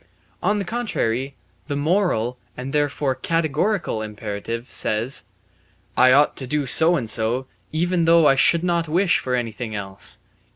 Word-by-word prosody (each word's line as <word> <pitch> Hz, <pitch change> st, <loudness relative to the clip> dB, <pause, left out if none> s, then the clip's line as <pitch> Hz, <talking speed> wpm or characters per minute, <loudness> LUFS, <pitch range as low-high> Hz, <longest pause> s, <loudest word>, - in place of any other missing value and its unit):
On 210 Hz, -, +1 dB
the 200 Hz, -, -2 dB
contrary, 140 Hz, -, -2 dB, 0.3 s
the 145 Hz, -, -2 dB
moral, 145 Hz, -, 0 dB, 0.2 s
and 130 Hz, +2 st, -6 dB
therefore 145 Hz, -2 st, 0 dB
categorical, 165 Hz, -, -1 dB
imperative 110 Hz, +2 st, -5 dB
says: 115 Hz, +5 st, -1 dB, 0.7 s
"I 130 Hz, 0 st, +6 dB
ought 145 Hz, +3 st, +4 dB
to 130 Hz, -, -5 dB
do 150 Hz, +2 st, -1 dB
so 160 Hz, +6 st, +5 dB
and 125 Hz, -8 st, -2 dB
so, 115 Hz, +4 st, 0 dB, 0.3 s
even 170 Hz, +2 st, +1 dB
though 165 Hz, -1 st, +5 dB
I 140 Hz, -, +6 dB
should 165 Hz, +5 st, +4 dB
not 170 Hz, -2 st, 0 dB
wish 175 Hz, +3 st, +3 dB
for 125 Hz, -1 st, -2 dB
anything 115 Hz, -2 st, -4 dB
else." 95 Hz, -1 st, -3 dB
140 Hz, 150 wpm, -22 LUFS, 115-165 Hz, 0.7 s, I